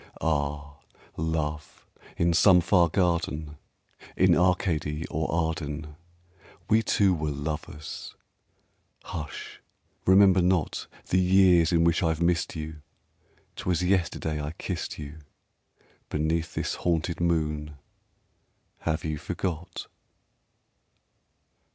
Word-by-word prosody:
Ah, 75 -1 -2 0.4
Love! 75 -1 -3 0.3
in 85 0 +2
some 90 +2 +6
far 90 -1 +3
garden, 80 -4 0 0.6
In - - +5
Arcady 85 -4 +1
or 80 +1 -1
Arden, 80 -2 -2 0.7
We 110 +1 +4
two 100 -3 +3
were 75 -3 -2
lovers! 75 +1 -6 0.9
Hush 75 -3 -7 0.5
remember 95 -1 +6
not 90 -2 0 0.2
The 90 - +3
years 90 -2 +5
in 85 -1 +3
which 85 0 +3
I've 80 -3 +1
missed 85 0 +1
you 80 -1 -6 0.8
'Twas 90 0 0
yesterday 85 -4 0
I 75 +2 -4
kissed - - -5
you 75 +1 -8 0.9
Beneath 80 +2 -1
this - - -1
haunted 85 -1 0
moon! 75 -3 -1 1.0
Have 80 -1 -2
you 75 -1 -2
forgot? 85 0 -4
80 Hz, 100 wpm, -27 LUFS, 75-90 Hz, 1.0 s, some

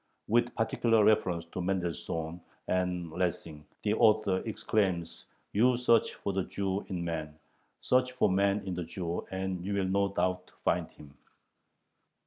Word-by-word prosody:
With 120 +2 +2
particular 115 -1 +2
reference 90 -6 +2
to 95 - -2
Mendelssohn 85 -2 -2 0.3
and 90 -2 -1
Lessing 85 -3 -3 0.2
the 105 - +2
author 110 -4 +4
exclaims: 95 -6 -1 0.3
"You 120 +4 +4
search 115 -2 +3
for 100 - -3
the 95 -1 0
Jew 100 0 -2
in 90 -3 -3
man. 80 -2 -4 0.4
Search 125 0 +2
for 125 - +3
man 100 +1 +2
in 95 - -3
the 90 0 -3
Jew, 85 +1 -4
and 95 -1 -3
you 100 +2 -2
will 100 -1 +1
no 100 +1 +1
doubt 90 -1 -1
find - - +1
him." 75 -1 -15
95 Hz, 145 wpm, -30 LUFS, 85-105 Hz, 0.4 s, author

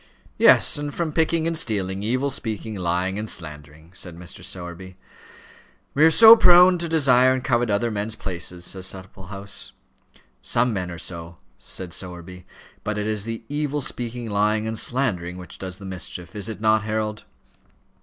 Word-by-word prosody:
"Yes; - - +5
and 145 0 -4
from 160 0 -3
picking 160 0 +1
and 165 0 -1
stealing, 100 - -1
evil 130 +6 0
speaking, 110 -3 -3
lying, 90 +1 -1
and 110 0 -5
slandering," 75 0 -7
said 90 -3 -7
Mr. 90 0 -10
Sowerby. 90 +1 -7 1.0
"We 145 - +3
are 160 - +8
so 225 +6 +10
prone 180 -3 +6
to 170 -1 -3
desire 130 -5 +4
and 130 -1 -3
covet 120 -3 +1
other 105 +3 0
men's 105 +1 -3
places," 90 -3 -5
said 95 0 -2
Supplehouse. 95 +1 -5 0.7
"Some 120 - +1
men 90 -3 -3
are 85 - -7
so," 85 0 -7 0.2
said 90 -3 -6
Sowerby; 90 0 -8 0.4
"but 105 0 -3
it 105 - -2
is 105 -1 -1
the 115 0 -5
evil 145 0 -2
speaking, 120 -2 -4
lying, 105 +1 +1
and 110 0 -2
slandering, 95 -9 -1
which 90 -1 -9
does 95 -1 -6
the 100 - -11
mischief. 90 0 -6
Is 105 0 -4
it 110 - -6
not, 110 0 +3
Harold?" 110 0 -3
105 Hz, 165 wpm, -23 LUFS, 90-125 Hz, 1.0 s, so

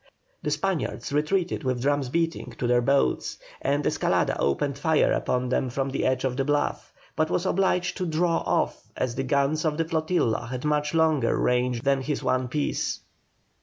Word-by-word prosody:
The - - -2
Spaniards 190 -6 -2
retreated 170 +3 0
with 130 -2 0
drums 145 -2 +1
beating 165 -5 -2
to - - -2
their 120 0 +3
boats, 135 +3 +1 0.2
and 145 +1 0
Escalada - - +1
opened 140 - 0
fire 160 0 +3
upon 125 0 0
them 130 0 0
from 135 +2 -2
the 135 - 0
edge 130 0 0
of 130 -1 -1
the 135 - +1
bluff, 145 +1 -1 0.2
but 155 0 +1
was 175 - 0
obliged 180 -1 +1
to 185 -3 -2
draw 165 +1 +1
off - - 0 0.2
as 125 -2 -1
the 135 - -2
guns 140 +3 +1
of 155 -2 0
the 165 - +1
flotilla 155 -8 0
had 125 +3 -5
much 150 +1 0
longer 155 -7 +3
range 125 -1 +1
than 135 -1 +2
his 145 +2 -3
one 130 0 +1
piece. 145 +4 -2
145 Hz, 180 wpm, -26 LUFS, 130-160 Hz, 0.2 s, their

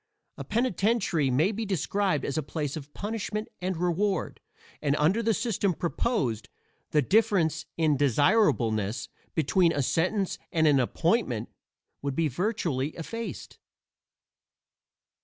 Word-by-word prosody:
A - - -6
penitentiary 210 - +1
may 150 - +3
be 220 +1 -3
described 190 -4 0
as 140 - -2
a 155 - +1
place 145 0 -4
of 145 -2 -8
punishment 210 0 -3
and 185 -1 -2
reward; 180 +2 -1 0.4
and 145 -1 +1
under 165 +10 +2
the 225 0 +2
system 215 -5 0
proposed, 145 - -1 0.4
the 150 -2 +3
difference 185 - +2
in 155 -3 +2
desirableness 130 - +2 0.3
between 165 +3 +3
a 145 - 0
sentence 185 - 0
and 160 -3 +2
an 145 -3 +5
appointment 130 - 0 0.5
would 140 -1 -3
be 160 0 +1
virtually 160 - -1
effaced. 230 +8 -6
165 Hz, 120 wpm, -28 LUFS, 145-205 Hz, 0.5 s, an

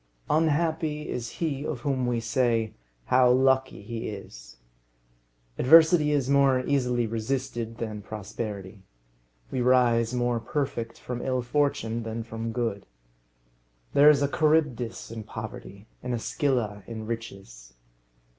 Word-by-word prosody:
Unhappy 155 -1 +1
is 120 -1 -4
he 145 -4 -2
of 135 -5 -4
whom 130 -2 0
we 120 -1 0
say, 115 -1 0 0.3
how 125 0 +4
lucky 130 -2 +2
he 115 +2 -5
is! - - -10 1.0
Adversity 160 +2 +6
is 140 -3 +1
more 140 -2 +4
easily 125 -4 +1
resisted 115 0 -3
than 110 -3 -5
prosperity. 105 -1 -6 0.7
We 130 - -1
rise 120 -2 +3
more 120 -1 0
perfect 120 -3 -3
from 125 -1 -5
ill 130 -2 -1
fortune 120 -4 0
than 115 0 -4
from 115 0 -5
good. 115 -4 -3 1.1
There 145 +1 +7
is 145 -1 +4
a - - +3
Charybdis 150 -8 0
in 115 -1 -6
poverty, 110 -1 -8 0.2
and 125 -1 -2
a - - -1
Scylla 115 -5 -1
in 110 -2 -6
riches. 95 - -8
120 Hz, 125 wpm, -27 LUFS, 110-135 Hz, 1.1 s, There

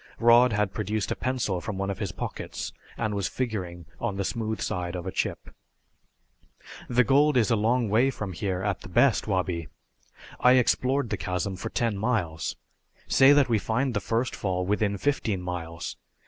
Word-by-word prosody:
Rod 120 +1 +6
had 105 -2 0
produced 105 0 -2
a - - 0
pencil 125 -8 -1
from 105 -1 -5
one 100 0 -1
of 100 - -6
his 100 -6 -2
pockets - - -5 0.2
and 110 - -1
was 100 -2 -1
figuring 95 -9 -4
on 115 -4 -2
the 100 0 -2
smooth 110 -1 -2
side 90 0 -3
of 90 -1 -5
a 95 - -3
chip. - - -3 1.4
"The 125 +1 +4
gold 145 +2 +4
is 115 -1 +3
a - - +5
long 115 +3 +2
way 115 +6 +3
from 105 -7 -5
here 95 +1 -2
at 100 -2 -1
the - - -10
best, 125 +7 +3
Wabi. 90 -5 -1 0.7
I 125 - +6
explored 130 0 +2
the - - 0
chasm 90 +1 -2
for 95 - -5
ten 115 -4 -1
miles. 100 -9 -1 0.5
Say 135 +1 +6
that 145 -2 +4
we 115 -3 +2
find 125 +5 0
the 105 - 0
first 115 +3 -1
fall 90 -2 -1
within 100 +1 0
fifteen 110 -5 0
miles. 85 -2 -5
105 Hz, 180 wpm, -27 LUFS, 95-120 Hz, 1.4 s, Rod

